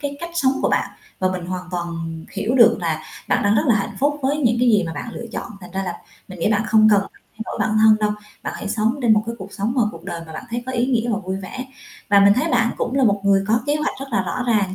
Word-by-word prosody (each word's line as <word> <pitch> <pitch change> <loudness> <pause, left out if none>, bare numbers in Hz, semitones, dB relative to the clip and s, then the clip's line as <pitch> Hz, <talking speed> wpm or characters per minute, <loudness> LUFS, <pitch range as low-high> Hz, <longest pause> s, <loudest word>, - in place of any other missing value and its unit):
cái 285 -1 -4
cách 340 0 -5
sống 270 -6 +3
của - - +3
bạn - - 0 0.3
và 185 - +1
mình 180 -2 -5
hoàn 180 0 -5
toàn 175 -1 -3 0.4
hiểu 210 +4 -1
được 235 -4 +6
là 160 -2 -2 0.2
bạn - - +2
đang 205 +1 +3
rất 220 - +2
là 240 - +5
hạnh 200 -2 -2
phúc 290 +2 +1
với 275 +2 +1
những 240 -6 +2
cái 250 - +4
gì 210 -4 +4
mà 165 - -4
bạn 150 - -6
lựa 235 - -7
chọn, - - -5
thành 180 -1 -11
ra 195 0 -2
là 185 -2 -3 0.4
mình 185 -2 -9
nghĩ 210 - +2
bạn 215 0 +2
không 215 0 +5
cần 205 -1 +5
phải 195 - -10 0.2
thay - - -3
đổi - - -6
bản 215 0 +1
thân 220 0 +6
đâu, 210 0 +2 0.3
bạn - - -4
hãy - - -5
sống 225 +5 0
trên 235 -2 +5
một 210 0 +3
cái 230 - -3
cuộc 190 - -9
sống 205 +4 -2
mà 250 - +4
cuộc 165 - -12
đời 170 - -5
mà 160 - -10
bạn 155 - -7
thấy 240 +1 -3
có 260 - -3
ý 245 -1 +1
nghĩa 240 -2 +1
và - - +1
vui 190 -2 -4
vẻ. 195 +7 -7 0.4
Và 200 -1 +6
mình 200 0 +7
thấy 290 +8 0
bạn 235 -3 +3
cũng 245 - -2
là 275 -1 +3
một 205 -3 +2
người 195 -1 +3
có 225 +2 +3
kế 290 +1 +2
hoạch 305 - -2
rất 275 - -5
là 200 -5 +1
rõ 245 +7 -3
ràng 205 -5 +1
215 Hz, 305 wpm, -21 LUFS, 195-245 Hz, 0.4 s, mình